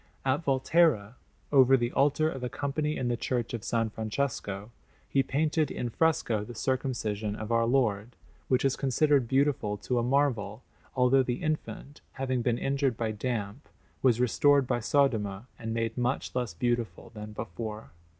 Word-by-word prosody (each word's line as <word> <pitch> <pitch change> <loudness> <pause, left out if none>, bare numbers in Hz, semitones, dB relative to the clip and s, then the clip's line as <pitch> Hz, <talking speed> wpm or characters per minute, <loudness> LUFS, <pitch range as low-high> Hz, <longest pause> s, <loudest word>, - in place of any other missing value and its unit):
At 135 +4 +1
Volterra, 135 -5 +2 0.4
over 135 -1 +6
the 120 0 -1
altar 145 +3 +2
of 135 -5 -4
a 125 - -2
Company 150 +5 -2
in 125 - -1
the 120 - +1
Church 120 0 -2
of 115 - -3
S. - - -6 0.2
Francesco, 110 -3 -3 0.4
he 135 - +2
painted 150 +2 0
in 120 - -3
fresco 120 -7 +1
the 120 +3 -9
Circumcision 110 -5 -2
of 110 +1 -6
Our 115 0 +3
Lord, 120 -3 +1 0.3
which 130 +1 +2
is 135 - +2
considered 140 -1 +2
beautiful 130 -6 +1
to 125 +3 -1
a - - 0
marvel, 120 -5 0 0.3
although 130 +1 +4
the 125 +4 -2
Infant, 155 -2 -4
having 130 -2 -1
been 120 0 +1
injured 135 -2 0
by 115 -2 -1
damp, 110 +2 -4 0.3
was 125 -3 +3
restored 140 +3 +4
by 120 - 0
Sodoma 110 -6 +1
and 115 -2 -4
made 115 +1 -2
much 125 +2 -1
less 125 -8 -2
beautiful 120 +1 -2
than 105 -1 -8
before. 105 -4 -6
125 Hz, 160 wpm, -29 LUFS, 110-135 Hz, 0.4 s, over